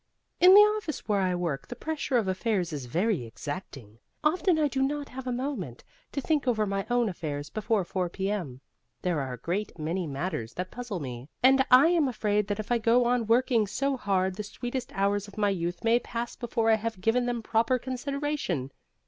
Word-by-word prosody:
In 365 +2 +8
the 410 - +11
office 420 -8 +1
where 205 -2 +2
I 185 -1 +1
work 170 -6 -3
the 245 - -6
pressure 295 -2 -1
of 220 -5 +1
affairs 185 -3 -1
is 140 -4 -5
very 175 - 0
exacting. 120 - -8 0.2
Often 345 +2 +3
I 305 -1 +3
do 270 -1 -2
not 285 +1 -1
have 260 0 -7
a - - 0
moment 240 - -4 0.3
to 285 - -2
think 290 -1 0
over 215 -3 +2
my 195 -1 -2
own 240 -1 +2
affairs 150 -6 -4
before 215 -2 0
4 180 0 -2
p.m. 185 -9 -3 0.4
There 175 -4 +1
are 130 -2 -4
a - - -6
great 180 - -3
many 165 +3 -2
matters 135 -5 -4
that 180 +1 -4
puzzle 240 -6 -5
me, 130 -1 -7
and 265 +1 +6
I 260 +6 +7
am 335 -5 +3
afraid 210 -4 0
that 205 0 -2
if 215 - -5
I 240 - +3
go 235 +2 +4
on 240 -2 +1
working 235 -2 +3
so 275 +7 0
hard 190 -5 0
the 210 - -3
sweetest 245 +4 -5
hours 200 +1 +1
of 205 - -14
my 205 -1 +2
youth 175 -2 -3
may 230 +1 +4
pass 235 0 -5
before 230 -2 0
I 220 - +5
have 225 -2 -4
given 230 +5 +1
them 240 -2 -2
proper 230 +4 +2
consideration. 260 - -3
215 Hz, 205 wpm, -28 LUFS, 180-250 Hz, 0.4 s, the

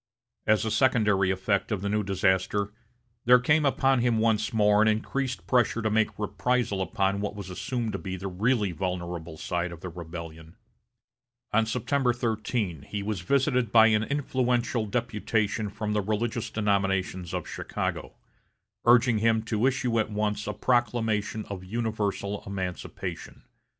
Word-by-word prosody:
As 110 0 +3
a 110 - -1
secondary 105 -8 +3
effect 95 +3 0
of 105 -3 -1
the - - -1
new 105 +1 +1
disaster, 100 +1 0 0.5
there 125 +1 +8
came 150 +4 +3
upon 135 -1 +2
him 120 -1 +2
once 110 -1 +1
more 105 -1 +4
an 110 - +4
increased 125 +4 -1
pressure 120 -2 +2
to 110 - +1
make 110 0 +1
reprisal 110 -1 0
upon 95 +2 0
what 105 0 -3
was 100 -2 -7
assumed 110 +5 -3
to - - -3
be 95 -2 -5
the 95 +2 -5
really 105 +2 +1
vulnerable 85 -2 -4
side 85 +1 -2
of 85 -1 -10
the 90 - -5
rebellion. 80 -1 -9 1.0
On 110 +1 +3
September 125 +2 +1
13, 110 - -2
he 100 +7 -5
was 105 -3 -3
visited 125 - +1
by 110 -1 +7
an 105 -1 +3
influential 125 -3 0
deputation 110 -1 -1
from 105 +1 -3
the 105 - +1
religious 110 +3 -2
denominations 95 -4 0
of 90 -3 -3
Chicago, - - -4 0.7
urging 120 -1 +5
him 110 0 +2
to 110 +2 +1
issue 125 -3 +1
at 110 - 0
once 105 +1 -2
a - - -2
proclamation 115 -3 0
of 95 -2 -6
universal 105 -1 -2
emancipation. 95 -2 -5
105 Hz, 150 wpm, -27 LUFS, 95-120 Hz, 1.0 s, there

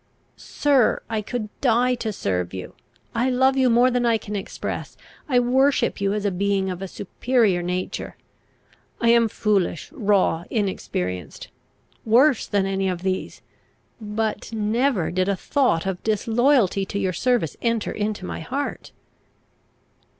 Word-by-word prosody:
] - - -41
"Sir, 280 -5 +2
I 220 -1 0
could 215 0 -4
die 250 0 +3
to 220 -2 -2
serve 90 - -2
you! 90 - -7 0.4
I 240 +3 +1
love 260 +1 +3
you 260 -2 +3
more 240 +2 +4
than 245 0 +1
I 230 -1 +3
can 210 -1 -7
express. 195 - -5 0.3
I 250 -3 +4
worship 265 0 +2
you 195 0 +1
as 210 -1 -2
a 200 - +2
being 195 0 0
of 180 0 -6
a 195 - -4
superior 205 0 0
nature. 180 +1 -4 0.8
I 235 - +2
am 235 -1 +5
foolish, 200 - 0
raw, 200 - +1
inexperienced, 90 - -3 0.5
worse 250 +4 +4
than 200 -2 +1
any 195 0 0
of 180 -1 -4
these; 185 0 -3 0.6
but 215 +1 -3
never 220 - 0
did 185 +2 0
a 200 - +2
thought 250 - +1
of 190 -2 -3
disloyalty 225 -1 +2
to 195 - -4
your 190 -2 0
service 240 - 0
enter 230 -2 0
into 210 -2 -3
my - - -5
heart." 275 - -4
210 Hz, 150 wpm, -23 LUFS, 190-245 Hz, 0.8 s, am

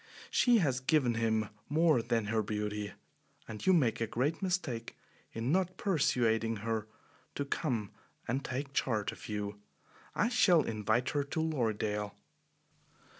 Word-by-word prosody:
She 245 -2 +5
has 135 - +1
given 130 -2 +2
him 110 -2 0 0.2
more 155 -3 +4
than 115 -2 0
her 110 +1 +1
beauty, 105 -1 -3 0.5
and 110 -1 -7
you 190 - +5
make 130 -11 +3
a 115 - +1
great 140 - -1
mistake 175 -12 -2 0.3
in 115 +4 -2
not 185 +1 +1
persuading 115 - +2
her 110 -2 -1 0.5
to 140 - -2
come 120 - -2 0.4
and 130 +4 -1
take 135 +2 -4
charge 110 -7 0
of - - -11
you. 105 -1 -3 0.6
I 230 - +2
shall 185 -10 +5
invite 110 +2 0
her 145 -1 +1
to 150 +3 -3
Lorridaile." 110 -9 -1
120 Hz, 140 wpm, -32 LUFS, 110-155 Hz, 0.6 s, She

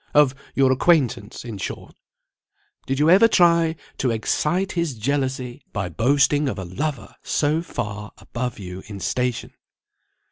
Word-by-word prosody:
of 145 -3 +6 0.2
your 135 -1 +4
acquaintance, 130 - +1
in 110 -4 -6
short? - - -6 0.9
Did 135 - -1
you 150 +2 +3
ever 200 +5 +7
try 170 -5 +4 0.2
to 130 - +1
excite 150 - 0
his 170 -6 -1
jealousy 130 +1 -2
by 100 -4 -2
boasting 140 - +2
of - - -4
a 95 - -5
lover 120 - -4
so 155 +2 +1
far 105 -9 -5
above 125 0 -5
you 90 -1 -7
in 100 -2 -7
station?" 125 +4 -2
130 Hz, 140 wpm, -23 LUFS, 110-150 Hz, 0.9 s, ever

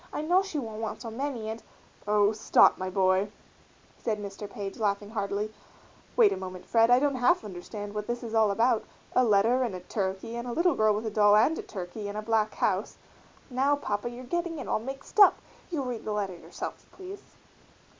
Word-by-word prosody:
I - - -3
know 350 +5 +3
she 390 -5 -5
won't 225 -5 -4
want 220 - -4
so 230 - -6
many 245 -2 -3
and 220 +1 -5 0.2
" - - -28
"Oh! 205 0 +4
stop, 220 0 +4
my 185 0 -2
boy," 190 +1 +2 0.7
said 220 -2 -1
Mr. 200 0 -7
Page, 200 0 -6
laughing 205 -1 -1
heartily; 205 0 -2 0.6
"wait 455 -4 +6
a - - -4
moment, 185 -1 -7
Fred, 230 0 +4
I 245 - +7
don't 285 +2 +2
half 250 +2 +3
understand 205 +2 -7
what 210 0 -4
this 240 +1 -3
is 230 -1 -6
all 220 -2 +4
about 225 +3 +2 0.3
a 255 - +5
letter 225 +3 +4
and 235 -7 -1
a - - -5
turkey 190 +4 -3
and 235 +1 -5
a 240 - -3
little 345 +4 +3
girl 215 -1 +3
with 215 +2 -3
a 220 - -2
doll 205 -1 +5
and 235 +10 +4
a - - -2
turkey 200 +2 -6
in 205 - -5
a 215 - -3
black 220 -1 +1
house - - 0 0.3
" - - -28 0.2
"Now, 270 +3 +3
Papa, 210 -5 -3
you're 240 +1 -9
getting 340 +5 -2
it 270 - -6
all - - +1
mixed 270 - -6
up; 400 - +9 0.3
you 315 -6 -2
read 245 -3 -4
the 215 - -3
letter 200 -3 -2
yourself, 170 - -8
please." 385 +1 -9
220 Hz, 215 wpm, -28 LUFS, 205-255 Hz, 0.7 s, up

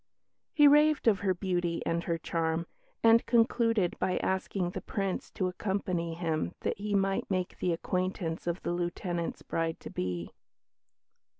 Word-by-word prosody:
He 295 -1 +6
raved 295 -1 +5
of 205 -4 +5
her 190 -2 +1
beauty 175 -2 -1
and 170 0 -1
her 170 -1 0
charm, 165 0 -1 0.4
and 230 0 +6
concluded 230 -4 +3
by 185 - +1
asking 190 -1 -1
the - - -5
Prince 195 -3 -3
to 185 - 0
accompany 180 -3 -2
him 165 0 -2
that - - -2
he 205 0 -1
might 195 0 +1
make 185 -2 -2
the 180 - +1
acquaintance 180 -1 -2
of 170 +2 -2
the - - -1
Lieutenant's 175 0 -3
bride 165 0 -2
to - - -8
be. 90 -2 -3
180 Hz, 155 wpm, -30 LUFS, 170-200 Hz, 0.4 s, He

